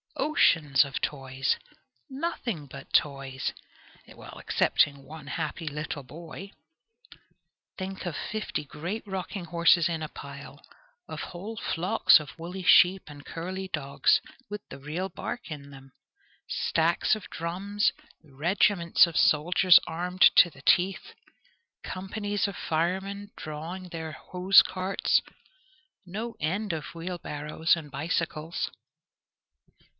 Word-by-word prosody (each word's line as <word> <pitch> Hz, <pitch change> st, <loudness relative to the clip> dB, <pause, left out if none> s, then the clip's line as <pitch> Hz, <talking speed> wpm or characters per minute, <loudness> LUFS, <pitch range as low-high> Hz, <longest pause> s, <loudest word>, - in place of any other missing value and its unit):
Oceans 165 Hz, -, +4 dB
of 140 Hz, -1 st, -4 dB
toys! 135 Hz, -2 st, -1 dB, 0.5 s
Nothing 265 Hz, -, -3 dB
but 135 Hz, -, -11 dB
toys! 135 Hz, -2 st, 0 dB, 0.5 s
Excepting 140 Hz, -1 st, 0 dB
one 150 Hz, +1 st, -11 dB
happy 160 Hz, +2 st, -4 dB
little 150 Hz, -1 st, -4 dB
boy! 170 Hz, +7 st, -10 dB, 1.3 s
Think 190 Hz, 0 st, -5 dB
of 175 Hz, -4 st, -3 dB
fifty 215 Hz, -6 st, -3 dB
great 170 Hz, +11 st, -5 dB
rocking 190 Hz, -1 st, -5 dB
horses 170 Hz, 0 st, +4 dB
in 165 Hz, -2 st, -3 dB
a 155 Hz, -, -4 dB
pile; 140 Hz, +1 st, -10 dB, 0.4 s
of -, -, -6 dB
whole 200 Hz, +6 st, -7 dB
flocks 175 Hz, -4 st, +4 dB
of 150 Hz, 0 st, -10 dB
woolly 180 Hz, +3 st, -6 dB
sheep 180 Hz, +1 st, +6 dB
and 145 Hz, -2 st, -11 dB
curly 185 Hz, +3 st, -5 dB
dogs, 140 Hz, -6 st, +2 dB, 0.3 s
with 210 Hz, 0 st, -7 dB
the -, -, -9 dB
real 155 Hz, +7 st, -3 dB
bark 215 Hz, +3 st, -6 dB
in 140 Hz, -2 st, -7 dB
them; 135 Hz, -1 st, -14 dB, 0.6 s
stacks 165 Hz, +5 st, +1 dB
of 215 Hz, -, -9 dB
drums; 195 Hz, +5 st, -1 dB, 0.3 s
regiments 170 Hz, +5 st, +3 dB
of 170 Hz, -2 st, -7 dB
soldiers 175 Hz, +4 st, +6 dB
armed 180 Hz, +3 st, +3 dB
to 175 Hz, -, +8 dB
the 140 Hz, -4 st, -17 dB
teeth; 190 Hz, +2 st, +2 dB, 0.7 s
companies 205 Hz, +2 st, -2 dB
of 200 Hz, -, -6 dB
firemen 190 Hz, +5 st, -2 dB
drawing 165 Hz, +5 st, -6 dB
their 160 Hz, -2 st, -6 dB
hose 185 Hz, +4 st, +5 dB
carts; 190 Hz, +1 st, +1 dB, 0.9 s
no 220 Hz, +6 st, -5 dB
end 190 Hz, +5 st, -1 dB
of 160 Hz, +1 st, -6 dB
wheel 175 Hz, +2 st, -4 dB
barrows 150 Hz, +2 st, 0 dB
and 155 Hz, -4 st, -9 dB
bicycles! 160 Hz, +2 st, -2 dB
170 Hz, 120 wpm, -28 LUFS, 150-190 Hz, 1.3 s, to